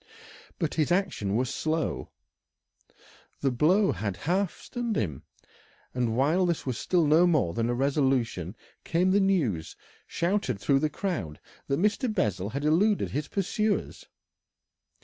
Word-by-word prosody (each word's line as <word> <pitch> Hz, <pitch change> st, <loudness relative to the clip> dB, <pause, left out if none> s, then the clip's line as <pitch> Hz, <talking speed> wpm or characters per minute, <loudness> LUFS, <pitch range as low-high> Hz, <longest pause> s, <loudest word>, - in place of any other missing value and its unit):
But 165 Hz, -5 st, -1 dB
his 160 Hz, +1 st, 0 dB
action 175 Hz, -, 0 dB
was 125 Hz, +1 st, 0 dB
slow, 160 Hz, 0 st, -2 dB, 1.3 s
the 135 Hz, -, +2 dB
blow 180 Hz, -, +3 dB
had 100 Hz, -4 st, -3 dB
half 180 Hz, +2 st, -1 dB
stunned 240 Hz, -3 st, -4 dB
him, 75 Hz, -, -2 dB, 0.7 s
and 120 Hz, -2 st, -1 dB
while 160 Hz, +8 st, +3 dB
this 170 Hz, -2 st, -1 dB
was 130 Hz, -4 st, -3 dB
still 175 Hz, -3 st, +2 dB
no 160 Hz, +4 st, +5 dB
more 150 Hz, -, +2 dB
than 115 Hz, +4 st, -1 dB
a 120 Hz, -, 0 dB
resolution 130 Hz, -, 0 dB, 0.3 s
came 180 Hz, +3 st, +1 dB
the 200 Hz, -, +4 dB
news, 150 Hz, -, 0 dB, 0.3 s
shouted 170 Hz, -, -1 dB
through 135 Hz, +7 st, +2 dB
the 155 Hz, +2 st, 0 dB
crowd, 110 Hz, -, -4 dB, 0.3 s
that 140 Hz, -, 0 dB
Mr. 215 Hz, +5 st, +1 dB
Bessel 100 Hz, -, -1 dB
had 140 Hz, +5 st, -4 dB
eluded 195 Hz, +7 st, +2 dB
his 150 Hz, +2 st, -2 dB
pursuers. 205 Hz, +2 st, -2 dB
150 Hz, 140 wpm, -27 LUFS, 120-185 Hz, 1.3 s, no